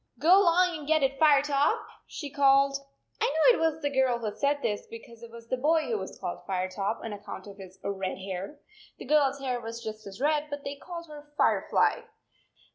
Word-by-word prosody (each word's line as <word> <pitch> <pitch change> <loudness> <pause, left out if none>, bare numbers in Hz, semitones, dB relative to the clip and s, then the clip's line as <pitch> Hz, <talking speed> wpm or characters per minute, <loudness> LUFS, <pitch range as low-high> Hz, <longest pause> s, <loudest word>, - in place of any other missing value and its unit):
" - - -31
Go 370 +5 +6
along 355 -2 +3
and 290 - -10
get 310 -2 +3
it, 270 0 0
Firetop," 290 -2 +4 0.3
she 290 -3 -7
called. 275 -1 +4 0.5
I - - +4
know 320 - +4
it - - -3
was 320 -1 0
the 285 - 0
girl 265 -3 +2
who 220 -3 -4
said 285 0 0
this, 205 -1 -2
because 230 0 -12
it 235 - -10
was 230 0 -12
the 255 - -1
boy 310 +5 +2
who 235 -6 -2
was 190 - -7
called 175 - -5
Firetop, 190 +3 -2
on 225 - -5
account 205 0 -8
of 200 -1 -11
his 190 -1 -11
red 195 -1 -3
hair. 190 +8 -6 0.4
The - - -9
girl 300 -2 +4
s 275 +1 -4
hair 255 -3 -2
was 230 +1 -7
just 215 -1 -7
as 195 +2 -10
red, 300 +2 +1
but 285 -1 -6
they 280 - -5
called 340 +3 -8
her 295 -1 -12
Firefly. - - +2
275 Hz, 215 wpm, -28 LUFS, 220-300 Hz, 0.5 s, Go